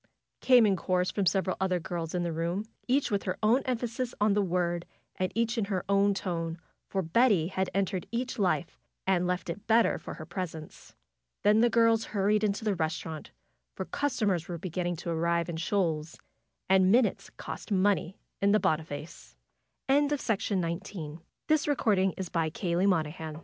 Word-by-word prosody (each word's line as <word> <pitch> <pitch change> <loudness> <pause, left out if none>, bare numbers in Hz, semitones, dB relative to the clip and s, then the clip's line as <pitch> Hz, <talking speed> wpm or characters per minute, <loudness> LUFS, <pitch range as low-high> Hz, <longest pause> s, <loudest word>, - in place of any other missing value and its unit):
came 250 -3 +6
in 200 -2 +3
chorus 180 0 0
from 200 -3 0
several 185 +2 +1
other 185 -1 +1
girls 170 -1 -4
in 175 - 0
the 170 -1 -2
room; 170 +5 -2 0.2
each 265 0 +2
with 200 -1 +1
her 185 -1 -2
own 235 +5 +4
emphasis 245 0 -2
on 210 0 +3
the 205 - +2
word, 175 -2 0 0.3
and 185 -1 -1
each 230 +1 +1
in 210 - 0
her 190 -3 -2
own 200 +1 +3
tone, 165 -3 -3 0.3
for 190 -1 -1
Betty 190 -1 +3
had 190 -1 -1
entered 190 -2 -1
each 245 +1 -3
life 180 -3 0 0.3
and 180 -2 +2
left 180 -1 -2
it 200 +5 -6
better 230 +1 +4
for - - -8
her 155 - -8
presence. 165 -3 -7 0.5
Then 210 +1 +5
the 240 - +5
girls 230 -1 +4
hurried 210 +1 +1
into 210 +1 0
the 210 - +2
restaurant, 160 -1 -3 0.5
for - - -4
cus 285 -2 -2
tomers 185 -6 +1
were 175 - -4
beginning 175 +1 -3
to 170 - -4
arrive 170 +1 0
in 165 - -3
shoals, 165 -3 -1 0.5
and 190 0 +5
minutes 235 0 +2
cost - - -8
money 195 -1 +1 0.2
in 200 +1 +4
the 215 - +5
190 Hz, 150 wpm, -29 LUFS, 170-215 Hz, 0.5 s, came